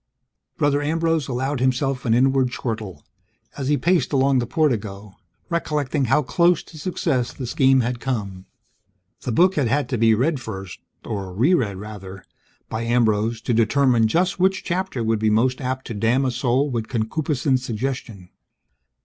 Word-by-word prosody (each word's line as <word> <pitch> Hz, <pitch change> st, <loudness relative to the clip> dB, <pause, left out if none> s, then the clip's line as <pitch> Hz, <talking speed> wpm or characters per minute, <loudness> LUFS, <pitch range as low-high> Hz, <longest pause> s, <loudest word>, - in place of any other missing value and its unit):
Brother 145 Hz, 0 st, +2 dB
Ambrose 165 Hz, 0 st, 0 dB
allowed 130 Hz, +2 st, -2 dB
himself 130 Hz, +1 st, 0 dB
an 115 Hz, -1 st, +3 dB
inward 130 Hz, +1 st, +3 dB
chortle, 110 Hz, -, -5 dB, 0.5 s
as 135 Hz, -, -4 dB
he 145 Hz, 0 st, +2 dB
paced 175 Hz, +2 st, +1 dB
along 135 Hz, -1 st, +3 dB
the 120 Hz, -, -2 dB
portico, 105 Hz, -10 st, -1 dB, 0.3 s
recollecting 150 Hz, -5 st, -1 dB
how 135 Hz, +5 st, +2 dB
close 170 Hz, +4 st, +2 dB
to 160 Hz, -, -13 dB
success 150 Hz, -7 st, -1 dB
the 130 Hz, -, -7 dB
scheme 130 Hz, +2 st, +3 dB
had 120 Hz, +1 st, -2 dB
come. 100 Hz, -8 st, -4 dB, 0.7 s
The 125 Hz, -, -3 dB
book 180 Hz, +10 st, +4 dB
had 140 Hz, -5 st, +2 dB
had 140 Hz, +5 st, 0 dB
to 125 Hz, -5 st, -1 dB
be 115 Hz, -1 st, +5 dB
read 140 Hz, +6 st, 0 dB
first 95 Hz, -6 st, -7 dB, 0.3 s
(or 100 Hz, -4 st, -4 dB
re 120 Hz, -, +2 dB
read, 105 Hz, -, 0 dB
rather) 95 Hz, -2 st, -9 dB, 0.4 s
by 110 Hz, -, -4 dB
Ambrose 115 Hz, -1 st, +1 dB
to 120 Hz, -, -1 dB
determine 115 Hz, 0 st, +3 dB
just 180 Hz, -, 0 dB
which 190 Hz, +1 st, +2 dB
chapter 180 Hz, -8 st, -2 dB
would 110 Hz, -1 st, +1 dB
be 110 Hz, 0 st, +2 dB
most 125 Hz, +5 st, +1 dB
apt 130 Hz, 0 st, -3 dB
to 120 Hz, -, -5 dB
damn 115 Hz, +6 st, +1 dB
a 130 Hz, -, +1 dB
soul 130 Hz, +3 st, 0 dB
with 115 Hz, -3 st, -2 dB
concupiscent 130 Hz, +3 st, 0 dB
suggestion. 120 Hz, -5 st, -5 dB
125 Hz, 165 wpm, -22 LUFS, 110-145 Hz, 0.7 s, be